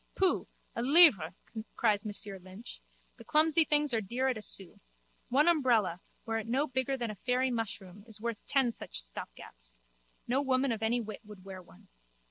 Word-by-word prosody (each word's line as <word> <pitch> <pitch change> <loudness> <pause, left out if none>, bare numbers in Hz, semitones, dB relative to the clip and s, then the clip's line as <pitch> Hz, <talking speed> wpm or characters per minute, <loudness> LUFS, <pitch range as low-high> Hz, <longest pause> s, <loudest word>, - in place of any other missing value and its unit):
Pooh! 380 -1 +2 0.3
A - - -2
livre! 255 - +7 0.4
cries 215 -2 +1
Monsieur 205 -1 -7
Lynch. 190 +5 -11 0.4
The - - -12
clumsy 315 +1 +4
things 295 -3 +2
are 225 - +1
dear 245 +6 -1
at 250 - -1
a - - -9
sou. 195 -4 -6 0.5
One 285 +6 +3
umbrella, 240 - +2 0.2
were 225 0 -1
it 225 - -7
no 265 +5 +1
bigger 260 -1 -2
than 235 -3 -3
a - - -8
fairy 255 +2 0
mushroom, 200 -4 -5
is 220 -2 -11
worth 230 -1 -4
ten 265 -3 +2
such - - -5
stopgaps. - - -11 0.5
No 260 +3 +1
woman 265 -1 +1
of 225 -1 -3
any 230 +2 +1
wit 215 -2 -8
would 205 -3 -13
wear 190 -1 -8
one. 130 - -20
230 Hz, 180 wpm, -31 LUFS, 200-265 Hz, 0.5 s, livre